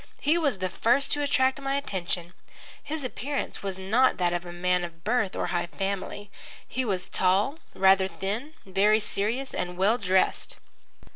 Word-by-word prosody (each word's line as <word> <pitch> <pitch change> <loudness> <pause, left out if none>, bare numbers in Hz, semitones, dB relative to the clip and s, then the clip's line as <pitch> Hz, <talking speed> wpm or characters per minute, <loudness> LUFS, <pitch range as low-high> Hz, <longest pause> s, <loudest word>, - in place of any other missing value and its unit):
He 300 +3 +3
was 290 - +1
the 185 0 -1
first 240 +8 +2
to 290 - +1
attract 265 -1 +2
my 275 0 -1
attention. 180 -9 -3 0.5
His 305 -1 -4
appearance 265 +4 -3
was 195 -2 -3
not 220 +8 +3
that 175 -1 +1
of 175 0 -3
a - - -6
man 180 +1 +1
of 170 -1 -8
birth 215 -3 +1
or - - -1
high 175 0 0
family. 200 +2 -4 0.4
He 260 - -2
was 190 -5 -2
tall, 195 - +1 0.2
rather 190 0 +5
thin, 215 +11 -4
very 200 +3 +3
serious, 220 +5 -1
and 180 0 -3
well 210 +6 +3
dressed. 190 -1 +1
200 Hz, 165 wpm, -27 LUFS, 185-260 Hz, 0.5 s, rather